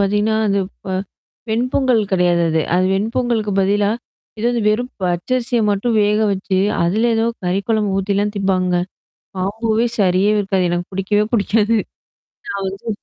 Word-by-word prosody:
பார்த்தீங்கன்னா, 210 +2 +1
அந்த 200 0 +1 0.3
ப - - -5 0.6
வெண்பொங்கல் 245 0 +1
கிடையாது 175 -2 +3
அது. 160 0 +1
அது 185 +1 +3
வெண்பொங்கலுக்கு 220 0 -1
பதிலா, 200 +1 +2 0.5
எதாவது 235 +1 0
வெறும் 245 +4 0
பச்சரிசிய 235 +7 0
மட்டும் 220 +3 0
வேக 210 +1 +2
வச்சு, 190 0 -1 0.3
அதில 220 +7 +2
ஏதோ 225 +1 +1 0.2
கறி 180 +2 0
குழம்பு 210 -3 +1
ஊத்திலாம் 200 +2 0
திப்பாங்க. 185 -2 +1 0.6
காம்போவே 220 +4 0
சரியாவே 200 +2 +3
இருக்காது. 190 -2 0
எனக்கு 175 0 -2
பிடிக்கவே 205 +2 +1
புடிக்காது. 220 +1 +2 0.7
நான் 200 -1 -3
வந்து 195 +4 -8
205 Hz, 135 wpm, -19 LUFS, 190-225 Hz, 0.7 s, கிடையாது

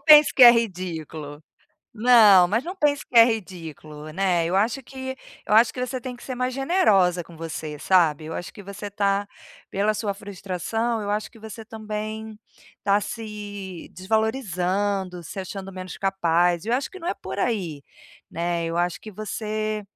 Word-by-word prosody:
pense 300 -2 +8
que 260 - +5
é 240 - +13
ridículo. 165 -9 -3 0.6
Não, 215 -6 +7
mas 215 +7 0
não 360 +6 -6
pense 290 -4 +1
que - - -5
é 230 - +11
ridículo, 165 - -5
né, 180 -1 +1
eu 170 +2 -1
acho 220 +7 +1
que 260 +1 -7 0.3
eu 210 - +2
acho 225 +2 +6
que 250 - -6
você 255 +1 -2
tem 250 0 -6
que 240 - -15
ser 260 - -5
mais 250 +1 -1
generosa 215 - +3
com 170 - -14
você, 155 -2 -5
sabe, 160 -3 +3
eu 160 - -6
acho 175 - -6
que 205 - -11
você 200 +1 -7
tá 200 0 0 0.4
pela 205 +2 +1
sua 210 -1 -2
frustração, 205 +3 -3
eu 205 - -4
acho 210 +1 -2
que 230 - -17
você 220 0 -9
também 215 0 -6 0.5
tá 200 +1 +3
se 205 -5 -7
desvalorizando, 195 -3 -1
se 190 - -6
achando 195 +1 -7
menos 185 -1 -7
capaz 175 -2 +1
e - - -5
eu 235 - +2
acho 265 +2 -1
que 380 - -10
não 340 -1 -5
é - - 0
por - - -7
aí, 175 - -1 0.5
né, 170 0 -1
eu 165 0 -3
acho 175 0 0
que 215 - -9
você 215 +1 -3
205 Hz, 180 wpm, -24 LUFS, 180-225 Hz, 0.6 s, é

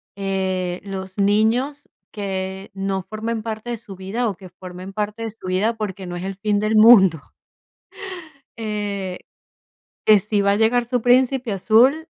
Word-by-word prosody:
eh, 190 -2 -2
los 190 -1 -7
niños 225 +8 +1 0.2
que 190 -1 -4
no 195 0 -2
formen 220 +1 -4
parte 220 +1 -5
de 235 - -3
su 205 -4 -11
vida, 205 +6 -2
o 195 - -4
que 185 -1 -13
formen 185 +1 -10
parte 210 +2 -3
de 225 - -3
su 205 -4 -11
vida, 205 +5 +1
porque 195 -3 -5
no 175 - -5
es 175 - -5
el 195 0 -4
fin 205 0 0
del 215 +1 0
mundo, 195 -8 +7 1.4
eh, 205 -4 -3 0.9
que 210 -2 +6
si 210 +1 0
va 200 0 +3
a - - +2
llegar 235 +2 +3
su 245 -1 -1
príncipe 250 -1 +3
azul, 245 - +4
205 Hz, 160 wpm, -21 LUFS, 190-225 Hz, 1.4 s, mundo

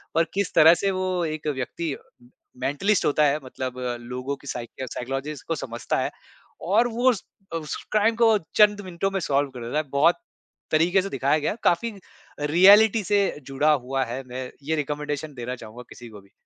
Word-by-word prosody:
पर 165 - +5
किस 200 -1 -1
तरह 160 +1 +8
से 195 +3 0
वो 185 -2 -1
एक 155 -1 -4
व्यक्ति 145 +3 -3 0.7
मेंटलिस्ट 170 +10 +1
होता 150 +1 +3
है, 145 +1 +2
मतलब 130 -1 -6 0.2
लोगों 125 +3 -4
की 140 - -14
साइकि 120 0 -6
या 130 - -2
साइकोलॉजिस्ट 135 +4 -5
को 165 - -1
समझता 120 -5 -3
है - - -1 0.6
और 225 +5 +4
वो 240 +2 +2
उस 210 - -5 0.3
अ, 165 - 0
उस 155 -2 -5 0.2
क्राइम 215 +2 +3
को 225 -2 +4 0.2
चंद 210 -1 +5
मिनटों 185 +1 -3
में 195 - -1
सॉल्व 145 -4 0
कर 125 -2 -8
देता 120 +6 -2
है। 155 - +1
बहुत 145 +6 +3 0.5
तरीके 170 +5 +3
से 195 - -5
दिखाया 140 +3 +1
गया 150 - -1
है, 215 - -6
काफ़ी 230 +7 +2
अ, 205 - -13 0.5
रियलिटी 205 +5 +7
से 205 +1 +2 0.3
जुड़ा 145 +3 +2
हुआ 135 -1 0
है, 125 +3 -5
मैं 125 +1 -6
ये 160 +3 -1
रिकमेंडेशन 150 0 -3
देना 125 +1 -4
चाहूँगा 120 +1 -11
किसी 120 -1 -11
को 105 -2 -12
भी। 100 - -25
150 Hz, 195 wpm, -24 LUFS, 130-190 Hz, 0.7 s, तरह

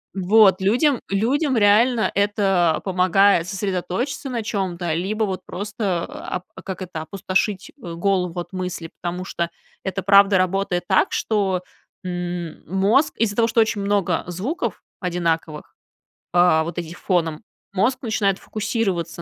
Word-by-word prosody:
Вот, 195 0 +5
людям 245 +7 +2
людям 260 +7 +1
реально 220 +3 +4
это 195 -5 +2
помогает 185 -1 +3
сосредоточиться 195 +8 -3
на 235 -3 -2
чём-то, 185 -6 -2
либо 205 +6 -1
вот 190 -2 -4
просто, 200 -3 -3
ап 180 0 -6
а 185 - -9
как 190 -1 -6
это, 175 -3 -5
опустошить, 190 +3 -2
э, 170 - -6
голову 180 -1 0
от 175 - -7
мыслей, 180 -3 -4
потому 180 +1 -3
что 170 -2 -2 0.3
это 190 0 -3
правда 200 0 +6
работает 185 -1 0
так, - - +3
что, 195 -4 0 0.4
м, 175 -2 -4
мозг 195 - +2
из-за 210 -3 +1
того, 230 0 +3
что 230 - +2
очень 220 -2 +2
много 200 -4 +1
звуков 215 - -3 0.2
одинаковых, 165 -4 -2 0.6
а, 175 -3 +5
вот 170 +2 -4
этих 170 0 -7
фоном, 165 -4 -1 0.3
мозг 230 +7 +1
начинает 205 -5 0
фокусироваться 200 -6 -2
190 Hz, 135 wpm, -22 LUFS, 175-210 Hz, 0.6 s, правда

